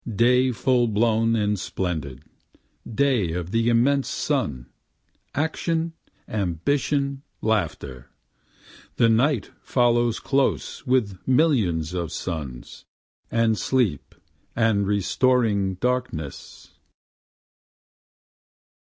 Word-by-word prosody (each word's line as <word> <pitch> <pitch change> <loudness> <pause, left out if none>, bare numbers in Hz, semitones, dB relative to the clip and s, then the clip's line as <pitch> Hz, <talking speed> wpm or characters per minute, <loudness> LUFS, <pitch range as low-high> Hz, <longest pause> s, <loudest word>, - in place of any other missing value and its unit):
Day 125 +3 +4
full 125 +1 +2
blown 115 +1 +2
and 105 -2 0
splendid 80 -9 -4 0.7
day 120 -9 +1
of 90 0 -4
the 115 +1 +2
immense 130 +4 +2
sun, 65 -4 -2 0.7
action, 160 +2 -1 0.3
ambition, 135 - -1 0.2
laughter, 75 - -2 0.9
The 115 - +4
Night 120 +2 +2
follows 120 -2 +2
close 140 +1 -1
with 110 -8 +1
millions 110 - +2
of 85 -3 -3
suns, 75 -8 -6 0.5
and 115 -2 +1
sleep 110 - 0 0.4
and 110 -4 +2
restoring 105 -1 +1
darkness. 120 - -4
115 Hz, 80 wpm, -24 LUFS, 90-130 Hz, 0.9 s, Day